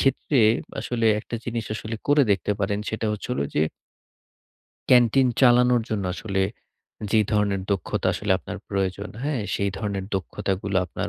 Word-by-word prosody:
ক্ষেত্রে 135 +1 +1 0.4
আসলে 115 -2 -1
একটা 120 - -7
জিনিস 115 -2 -3
আসলে 110 +1 -5
করে 145 0 +5
দেখতে 100 +1 +1
পারেন 100 +1 0
সেটা 110 0 -2
হচ্ছে 105 - -6
হলো 70 - -1
যে 75 - +3 1.3
ক্যান্টিন 125 +1 +5
চালানোর 125 -1 +5
জন্য 105 -3 -2
আসলে, 95 -2 -1 0.7
যে 110 - +4
ধরনের 100 -2 +1
দক্ষতা 95 -5 -2
আসলে - - 0
আপনার - - -7
প্রয়োজন 100 +1 -2
হ্যাঁ, 140 -6 -1
সেই 100 0 0
ধরনের 100 -2 -3
দক্ষতাগুলো 95 +1 -2
আপনার - - -4
105 Hz, 145 wpm, -24 LUFS, 100-120 Hz, 1.3 s, করে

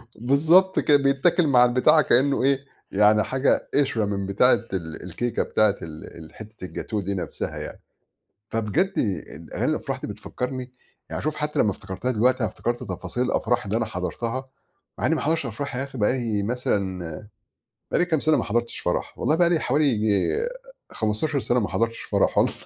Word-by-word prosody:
بالضبط 160 - +4
كده، 145 -1 +5
بيتاكل 140 +5 +2
مع 125 -3 +6
البتاع 125 +5 +4
كأنه 135 +1 +2
إيه 140 0 +2 0.3
يعني 105 +2 +4
حاجة 130 +1 +1
قشرة 125 -7 +2
من 100 -1 -2
بتاعة 100 +6 +4 0.2
ال 80 -4 -4
الكيكة 115 +7 -2
بتاعة 105 -2 +2
ال 80 0 -10
حتة 110 -3 -10
الجاتوه 105 +3 -4
دي 100 +2 -3
نفسها 95 - -4
يعني، - - -7 0.7
فبجد 120 - 0
ال 85 -5 -3
أغاني - - 0
الأفراح - - -3
دي - - -5
بتفكّرني 125 0 -5 0.4
يعني - - -4
شوف 155 0 -2
حتى 150 0 -2
لمّا 105 - +4
افتكرتها 95 +6 -4
دلوقتي 125 +3 +2
أنا 110 - +2
افتكرت 120 +5 -3
تفاصيل 100 +6 -4
الأفراح 120 -1 0
اللي 105 +2 -1
أنا 115 -1 0
حضرتها، 115 +7 -4 0.5
مع - - 0
إني 160 - +3
ما - - -2
حضرتش 160 -2 0
أفراح 125 +3 -5
يا 135 - -1
أخي 135 -3 -9
بقالي 110 -1 0
مثلًا 100 -6 -2 0.6
بقالي 175 - +3
كام 160 -4 +1
سنة 155 -1 +3
ما - - 0
حضرتش 120 +2 -1
فرَح، 90 - -2
والله 155 - +2
بقالي 170 -2 +3
حوالي 145 +4 +1
ييجي 110 - +1 0.4
15 130 +7 -1
سنة 120 0 +1
ما 105 - -1
حضرتش 115 0 -1
فرَح - - +1
والله، - - +3
120 Hz, 170 wpm, -24 LUFS, 105-140 Hz, 0.7 s, مع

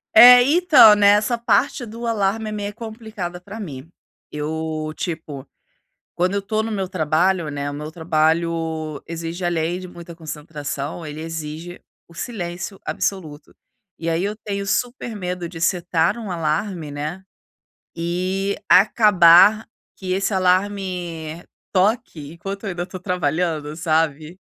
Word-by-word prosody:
É, 245 +2 +11
então, 295 -8 +7
nessa 205 +3 +4
parte 245 +2 +1
do 230 +2 -6
alarme 215 0 0
é - - -5
meia 205 -1 -4
complicada 220 -5 -7
pra 200 +4 -9
mim. 150 -5 -8 0.4
Eu, 155 +1 -3
tipo, 155 -5 -5 0.7
quando 180 +3 +1
eu 200 - 0
tô 215 +2 -1
no 225 - -4
meu 195 -3 -2
trabalho, 170 0 +1
né, 145 0 -3
o 145 - -6
meu 150 +2 -6
trabalho 160 -1 0
exige, 165 +2 -5
além 175 0 -1
de 185 - -8
muita 170 -1 -11
concentração, 150 0 -6
ele 150 +1 -7
exige 165 +2 -6 0.3
o 170 - -18
silêncio 180 -1 -5
absoluto. 160 -7 -4 0.4
E 165 0 -3
aí 165 +3 0
eu 205 +1 -2
tenho 200 -2 -5
super 240 +1 -2
medo 180 -3 -4
de 165 -2 -9
setar 175 +3 +1
um 220 -4 -6
alarme, 165 0 -2
né, 155 +6 -5 0.7
e 185 +4 -1
acabar 205 0 +6 0.3
que 185 -1 -6
esse 195 +2 0
alarme 180 -4 -1 0.3
toque 185 - 0
enquanto 195 +4 -7
eu - - -2
ainda 175 -1 -3
estou 185 0 -8
trabalhando, 160 -4 -1
sabe? 160 0 -1
175 Hz, 135 wpm, -21 LUFS, 160-200 Hz, 0.7 s, É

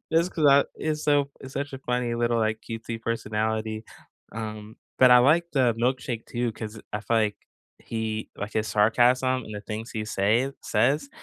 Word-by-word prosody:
just 170 +3 +2
'cause 155 -3 +2
I 140 +1 +6
it's 155 -1 -2
so 145 -1 +2
it's 135 0 -10
such 140 0 -3
a 135 - -6
funny 125 -2 -1
little, 120 0 +1
like, 110 -1 0
cutesy 115 0 -5
personality, 110 -1 -2 0.5
um, 110 -1 -7 0.2
but 130 -1 +7
I 125 - +9
like 155 +7 +4
the 125 -5 +3
Milkshake 120 -1 -2
too 120 -1 -2
'cause 110 0 -7
I 105 - -2
feel 115 +2 0
like 105 -2 0 0.4
he 110 -1 -4
like 105 +1 -5
his 110 0 0
sarcasm 125 +4 +3
and 110 - -8
the 105 - -5
things 110 +2 -6
he 110 -1 -3
say 110 +6 +1
says, 140 +7 +1
115 Hz, 180 wpm, -26 LUFS, 110-130 Hz, 0.5 s, I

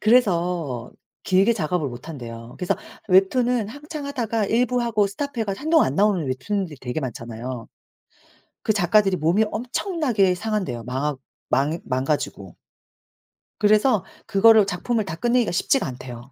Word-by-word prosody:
그래서 175 - +2 0.3
길게 195 +5 +3
작업을 170 -6 -1
못 120 +5 -10
한대요. 115 -5 -8
그래서 180 - 0 0.3
웹툰은 215 +4 +3
한참 295 +4 -7
하다가 230 -6 -1
일부하고 235 -2 +1
스톱해 240 +3 -3
가지고 195 -1 -4
한동안 320 +1 +4
안 130 - -4
나오는 195 -3 +2
웹툰들이 160 +6 -2
되게 125 +4 -3
많잖아요. 120 -1 -6 0.9
그 215 - +2
작가들이 195 0 +3
몸이 170 +7 +2
엄청나게 245 - 0
상한대요. 195 - -2
마악 135 +3 -2 0.3
망 145 +6 +1
망가지고. 130 - -2 1.1
그래서 210 0 +4 0.2
그거를 220 0 +6
작품을 210 +4 -1
다 160 - -5
끝내기가 235 +1 +1
쉽지가 185 - +1
않대요. 125 0 -9
195 Hz, 340 characters per minute, -23 LUFS, 140-225 Hz, 1.1 s, 그거를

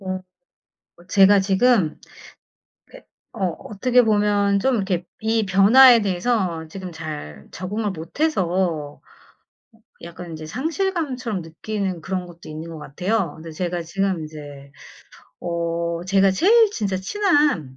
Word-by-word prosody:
음. 185 0 -3 0.8
어 175 - -18
제가 195 +1 +6
지금 195 -2 +2 0.9
그 - - -14 0.4
어 190 -2 +1 0.2
어떻게 250 +4 +2
보면 205 -2 +2
좀 260 +3 +2
이렇게 190 -4 -1 0.2
이 220 0 +1
변화에 230 +6 +7
대해서 185 -4 -1
지금 185 +1 -7
잘 150 - -8
적응을 205 +5 -3
못해서 175 - -2 1.0
약간 170 0 -9
이제 155 0 -8
상실감처럼 275 - -2
느끼는 185 +2 -4
그런 185 +1 -3
것도 170 -2 -13
있는 155 +2 -7
것 165 -1 -8
같아요. 180 +5 -2
근데 160 0 -10
제가 175 +2 -3
지금 185 +1 -2
이제 145 -2 -11 0.7
어 170 0 -2
제가 195 +1 +3
제일 425 - +4
진짜 200 - -2
친한 290 - +1
190 Hz, 245 characters per minute, -22 LUFS, 165-220 Hz, 1.0 s, 변화에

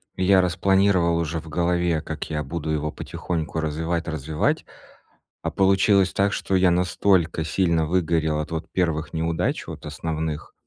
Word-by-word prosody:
Я 95 0 +4
распланировал 90 -1 +2
уже 80 0 -2
в 80 0 -11
голове, 85 -1 +1
как 80 0 -6
я 75 -1 -2
буду 80 +2 -5
его 75 0 -1
потихоньку 80 -2 -4
развивать, 80 +2 -2
развивАать, 80 -1 -1 0.8
а - - -2
получилось 95 0 +3
так, 100 +1 +2
что 95 - -1
я 90 -1 +4
настолько 90 -2 +2
сильно 85 -2 +1
выгорел 80 -2 +1
от 75 +1 -4
вот 80 -1 -5
первых 80 -4 -1
неудач, 80 0 -1
вот - - -8
основных, 80 -2 -4
85 Hz, 145 wpm, -24 LUFS, 80-90 Hz, 0.8 s, Я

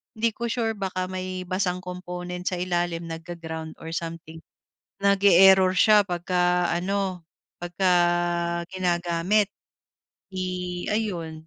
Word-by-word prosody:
hindi 225 +1 +1
ko 235 - -3
sure, 225 -2 -1
baka 185 -2 -3
may 185 0 -4
basang 185 -1 -1
component 180 0 -6
sa 180 -1 -1
ilalim 175 -2 -1
nagga-ground 165 -1 -7
or 160 - -8
something. 165 -1 -6 0.6
Nag-e-error 190 -1 +6
siya 210 +1 +6
pagka 180 0 +1
ano, 185 0 -2 0.4
pagka 175 +2 0 0.8
ginagamit 180 +2 +1 0.9
i 180 -1 -3
ayun, 170 -7 -3
180 Hz, 105 wpm, -25 LUFS, 175-190 Hz, 0.9 s, Nag-e-error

